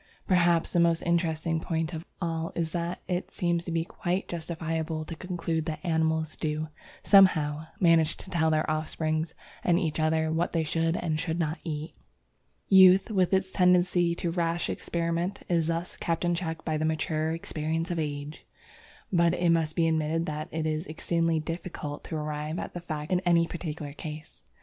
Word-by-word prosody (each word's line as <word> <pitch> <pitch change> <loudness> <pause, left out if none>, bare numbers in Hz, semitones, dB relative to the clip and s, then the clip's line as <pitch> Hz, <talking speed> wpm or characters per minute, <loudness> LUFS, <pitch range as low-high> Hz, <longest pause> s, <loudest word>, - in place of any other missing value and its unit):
Perhaps 175 -3 +3
the 175 - +3
most 170 -1 +3
interesting 165 -1 0
point 160 0 -2
of 160 +1 -6
all 165 -2 -2
is 165 -2 -1
that 170 +1 -3
it 180 0 -2
seems 170 -1 0
to 170 - -4
be 165 0 0
quite 180 +2 -2
justifiable 160 -1 -3
to 165 - -6
conclude 165 -2 -3
that 155 -1 -3
animals 160 -2 0
do, 155 0 -2 0.3
somehow, 160 -6 +5
manage 165 -3 +4
to 190 - -10
tell 160 -2 +2
their 155 0 +1
offspring 155 +1 -1 0.4
and 175 -1 +3
each 160 -4 -1
other 160 0 +2
what 165 +2 0
they 165 -2 +2
should 165 +2 0
and 155 -3 -1
should 165 0 -2
not 160 -1 -1
eat. 155 -2 -4 0.7
Youth, 190 +2 +7
with 185 -4 +2
its 190 -1 +1
tendency 180 -2 +3
to 170 -1 -2
rash 170 0 0
experiment, 170 +3 -2
is 165 -3 +1
thus 165 +1 -2
kept 165 +1 -1
in 175 - +2
check 165 -2 -4
by 155 -2 0
the 155 - -1
mature 155 0 0
experience 165 +1 -2
of 170 - -1
age. 145 0 -4 0.7
But 170 0 +4
it 175 -1 +2
must 160 -2 +1
be 165 -2 +3
admitted 160 +1 +1
that 155 -1 -4
it 160 0 -2
is 155 +2 -1
exceedingly 165 +1 0
difficult 155 -2 -5
to 160 - -5
arrive 150 +1 -3
at - - -5
the 175 - -5
facts 155 -2 -5
in 180 - +3
any 170 -2 +3
particular 155 -4 -5
case. 155 +1 -8
165 Hz, 180 wpm, -28 LUFS, 155-175 Hz, 0.7 s, Youth